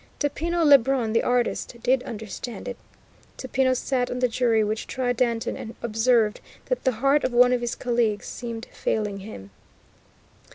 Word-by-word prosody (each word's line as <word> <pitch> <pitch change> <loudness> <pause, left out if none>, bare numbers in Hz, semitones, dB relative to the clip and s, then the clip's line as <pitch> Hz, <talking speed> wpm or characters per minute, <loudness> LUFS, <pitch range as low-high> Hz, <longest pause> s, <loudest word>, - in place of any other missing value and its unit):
Topino 330 +3 0
Lebrun, 270 -5 +4
the 230 - +3
artist, 245 0 0
did 255 0 +3
understand 220 0 -7
it. 245 - -4 0.6
Topino 260 0 +1
sat 250 -1 -1
on 250 - -3
the 250 0 +2
jury 230 -2 +2
which 215 +1 -3
tried 250 -2 -1
Danton, 235 -2 0
and 225 - -8
observed 225 -1 +2 0.3
that - - -1
the 260 - +4
heart 275 +6 +2
of 255 - -1
one 250 +1 +6
of 245 - 0
his 240 -1 -2
colleagues 235 -4 0
seemed 230 -2 -6
failing 210 -2 -2
him. 100 - -10
245 Hz, 160 wpm, -25 LUFS, 225-255 Hz, 0.6 s, one